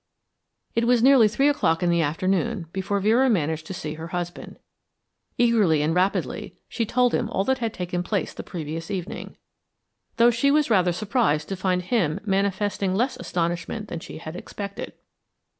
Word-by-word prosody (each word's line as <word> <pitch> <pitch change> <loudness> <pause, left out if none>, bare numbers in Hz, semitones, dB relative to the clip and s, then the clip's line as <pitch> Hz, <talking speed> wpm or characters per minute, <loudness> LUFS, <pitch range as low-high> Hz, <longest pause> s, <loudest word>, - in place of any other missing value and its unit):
It 230 0 +1
was 245 -1 +4
nearly 260 -4 +7
three 270 +7 +2
o'clock 235 - +2
in 175 - +3
the 170 0 +3
afternoon 185 +6 0
before 200 +1 -1
Vera 230 +6 +3
managed 160 -6 0
to - - -5
see 155 -3 -5
her 160 +1 -7
husband. 175 0 -5 0.8
Eagerly 210 -11 +3
and 155 +2 +1
rapidly 185 +3 -1
she 230 -3 -2
told 250 +1 +2
him 230 - 0
all 195 - 0
that 265 +4 0
had 230 -2 -1
taken 180 -1 -3
place 195 +2 -2
the - - -6
previous 165 0 -6
evening, 190 -2 -5 0.8
though 235 +1 +6
she 235 +4 +2
was 295 -3 +2
rather 185 -4 +4
surprised 195 - 0
to 195 - -2
find 185 -1 0
him 180 -7 0
manifesting 195 -1 0
less 255 +5 +1
astonishment 175 +2 -3
than 170 - -4
she - - -9
had 160 +1 -8
expected. 200 +2 -7
195 Hz, 170 wpm, -24 LUFS, 175-230 Hz, 0.8 s, nearly